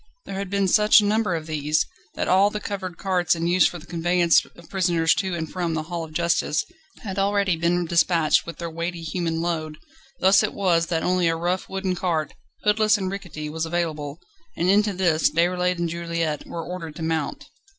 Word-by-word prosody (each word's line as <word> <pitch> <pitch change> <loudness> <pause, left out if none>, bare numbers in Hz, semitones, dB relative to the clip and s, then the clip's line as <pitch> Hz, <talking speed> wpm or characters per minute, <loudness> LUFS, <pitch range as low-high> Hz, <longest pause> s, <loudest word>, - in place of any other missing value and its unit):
There - - -7
had 195 0 -4
been 200 0 +1
such 210 +3 +6
a 210 - +1
number 215 -2 +1
of 160 -1 -4
these, 155 -1 0 0.3
that - - -2
all 195 +2 +5
the 210 - -4
covered 190 -4 -5
carts 180 -3 +1
in 165 0 -3
use 175 0 +4
for 175 - -6
the 165 - -13
conveyance 175 0 +3
of 170 - -15
prisoners 175 -4 +2
to 190 -2 -2
and 160 -1 -3
from 170 -1 -2
the 155 - -2
Hall 170 +1 -4
of 160 - -9
Justice 160 -2 0 0.4
had 195 -3 -4
already 200 -2 +2
been 170 +2 +1
despatched 165 -1 +3
with 170 - -7
their 170 - -4
weighty 170 +1 -4
human 165 0 -2
load; 155 -3 -3 0.4
thus 190 +1 +5
it 215 - -2
was 170 -4 +2
that 165 -2 -1
only 180 -1 +2
a 165 - +2
rough 175 +3 -2
wooden 190 -1 -2
cart, 170 -4 -1 0.3
hoodless 215 0 +3
and 190 -2 -3
rickety, 170 -6 -6
was 160 +2 -3
available, 160 -4 -3 0.4
and 175 +2 +1
into 210 +1 +3
this 175 -4 +2
Déroulède 180 +3 +1
and 170 0 -1
Juliette 170 -2 -3
were 165 -1 -5
ordered 170 -4 -6
to 165 - -6
mount. 160 -2 -2
175 Hz, 200 wpm, -24 LUFS, 165-190 Hz, 0.4 s, such